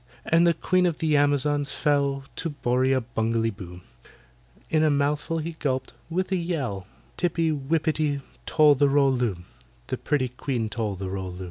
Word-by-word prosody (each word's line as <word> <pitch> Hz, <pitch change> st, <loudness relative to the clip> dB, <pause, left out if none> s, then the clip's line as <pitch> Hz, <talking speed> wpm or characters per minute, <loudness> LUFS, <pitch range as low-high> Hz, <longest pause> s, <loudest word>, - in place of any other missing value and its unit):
And 165 Hz, +1 st, +4 dB
the 170 Hz, -, +3 dB
Queen 180 Hz, +2 st, +2 dB
of 165 Hz, -3 st, -1 dB
the 155 Hz, -2 st, +1 dB
Amazons 145 Hz, 0 st, +1 dB
fell 140 Hz, -2 st, +1 dB
To 165 Hz, -, -1 dB
BORRIA 130 Hz, -2 st, +1 dB
BUNGALEE 115 Hz, 0 st, +1 dB
BOO,— 90 Hz, -3 st, -10 dB, 0.9 s
In 155 Hz, -1 st, +3 dB
a 155 Hz, -, +4 dB
mouthful 150 Hz, +3 st, 0 dB
he 165 Hz, +1 st, -3 dB
gulped, 130 Hz, -5 st, -3 dB, 0.2 s
with 185 Hz, +3 st, -2 dB
a 190 Hz, -, +2 dB
yell, 135 Hz, -, -3 dB, 0.3 s
TIPPY 165 Hz, -2 st, +1 dB
WIPPITY 150 Hz, 0 st, 0 dB, 0.3 s
TOL 150 Hz, -2 st, +6 dB
THE 140 Hz, +1 st, +3 dB
ROL 140 Hz, -1 st, +4 dB
LOO— 120 Hz, -6 st, 0 dB, 0.5 s
The -, -, -3 dB
pretty 130 Hz, -4 st, 0 dB
QUEEN 125 Hz, -2 st, -3 dB
TOL 110 Hz, -3 st, -2 dB
THE 95 Hz, 0 st, -5 dB
ROL 95 Hz, -1 st, -4 dB
LOO. 90 Hz, -, -10 dB
145 Hz, 165 wpm, -25 LUFS, 125-155 Hz, 0.9 s, TOL